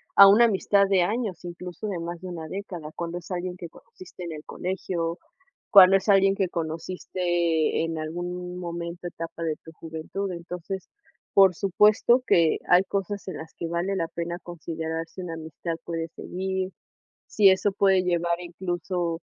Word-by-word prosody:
a 200 - +11
una 210 +4 +7
amistad 200 -2 +3
de 190 -2 +4
años, 205 -3 -2
incluso 175 +3 -6
de 185 -4 -3
más 170 +1 -5
de 185 +1 -7
una 165 -2 -6
década, 180 -6 -6
cuando 170 0 -4
es 175 - -14
alguien 180 0 -3
que 170 -2 -8
conociste 185 +1 -13
en 170 - -5
el 150 -1 -8
colegio, 175 -2 -3 0.5
cuando 195 -2 +9
es 195 +2 -4
alguien 195 0 +5
que 190 -3 0
conociste 170 0 -1
en 165 0 -3
algún 180 +3 -5
momento, 170 0 -5
etapa 165 -1 -6
de 155 -2 -1
tu 160 - -11
juventud, 165 +5 -5
entonces, 180 +2 -6 0.4
por 190 -3 +6
supuesto 210 +6 +4
que 165 -2 +4
hay 180 +1 +6
cosas 200 +1 -3
en - - -5
las 160 0 -9
que 170 - -3
vale 175 +4 -1
la 165 -3 -1
pena 170 +1 -4
considerar 165 -1 -5
si 185 - -9
una 170 -2 -5
amistad 160 +1 -5
puede 165 -1 -3
seguir, 190 +2 -4 0.6
si 200 -2 +5
eso 190 +2 +2
puede 195 -1 +3
llevar 170 -1 0
incluso 175 -1 -3
175 Hz, 170 wpm, -26 LUFS, 165-190 Hz, 0.6 s, a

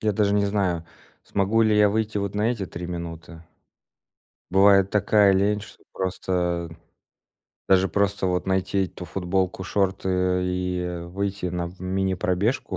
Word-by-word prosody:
Я 110 - +1
даже 100 0 +1
не 100 0 +2
знаю, 95 -5 0 0.4
смогу 100 +3 +1
ли 110 -1 +3
я 105 0 +5
выйти 110 0 -1
вот 100 0 -3
на 105 +3 +1
эти 105 -6 -3
3 85 0 -7
минуты. 85 -1 -7 1.1
Бывает 95 0 +5
такая 105 -1 +4
лень, 100 +2 +2
что 105 - -14
просто 90 -2 -2 1.0
даже 95 0 +4
просто, 100 +1 0
вот, 90 0 -1
найти 95 +1 +1
эту 90 - -10
футболку, 95 +1 -2
шорты, 95 -1 -1
э, 90 0 +1
и, 90 0 -2
э, 90 -1 -4
выйти 100 +1 -3
на 90 -1 -2
в 90 - -15
мини-пробежку 95 +3 -1
95 Hz, 150 wpm, -24 LUFS, 90-100 Hz, 1.1 s, я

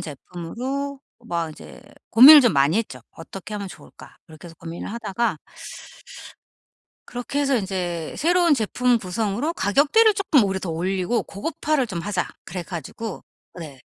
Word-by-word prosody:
제품으로 240 - -6 0.3
막 170 -4 -2
이제 155 - -13 0.3
고민을 280 +6 +10
좀 245 - +3
많이 140 +5 +3
했죠. 135 - -5
'어떻게 195 +5 -9
하면 200 -1 -4
좋을까?' - - -15
그렇게 160 +1 -13
해서 165 - -12
고민을 165 +4 -7
하다가 235 0 -2 1.7
그렇게 250 +4 -4
해서 275 -2 +2
'이제 180 -5 -3
새로운 345 -1 +3
제품 245 +1 +1
구성으로 215 - -2
가격대를 300 - +3
쪼끔 350 - +3
오히려 190 -1 -1
더 175 - -4
올리고 185 +7 -1
고급화를 290 +5 -2
좀 185 -6 -5
하자.' 190 0 -2 0.2
그래 180 0 -6
가지고 185 - -7 0.3
네 150 -6 -10
205 Hz, 325 characters per minute, -23 LUFS, 175-265 Hz, 1.7 s, 고민을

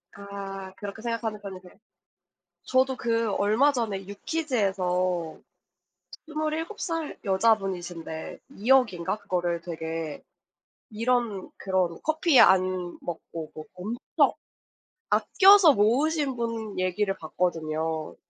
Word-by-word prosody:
아 195 -1 -7
그렇게 205 +1 -7
생각하는 230 -2 -3
편이세요? 185 -2 -9 0.9
저도 260 +2 +2
그 230 -2 0
얼마 220 +10 +3
전에 215 -7 -2
유퀴즈에서 190 - -1 0.9
27 310 +5 -3
살 330 -3 -3
여자분이신데 190 -6 -1 0.2
2 220 +6 -3
억인가 215 -8 +3
그거를 175 -4 -1
되게 160 -2 -5 0.7
이런 230 -3 0
그런 185 -3 0
커피 315 -3 +3
안 185 -1 +4
먹고 165 -2 -7
뭐 155 - -8
엄청 210 +7 0 0.8
아껴서 340 - +6
모으신 275 +6 +2
분 230 -3 -4
얘기를 195 +2 0
봤거든요. 160 -1 -2
200 Hz, 215 characters per minute, -27 LUFS, 180-240 Hz, 0.9 s, 아껴서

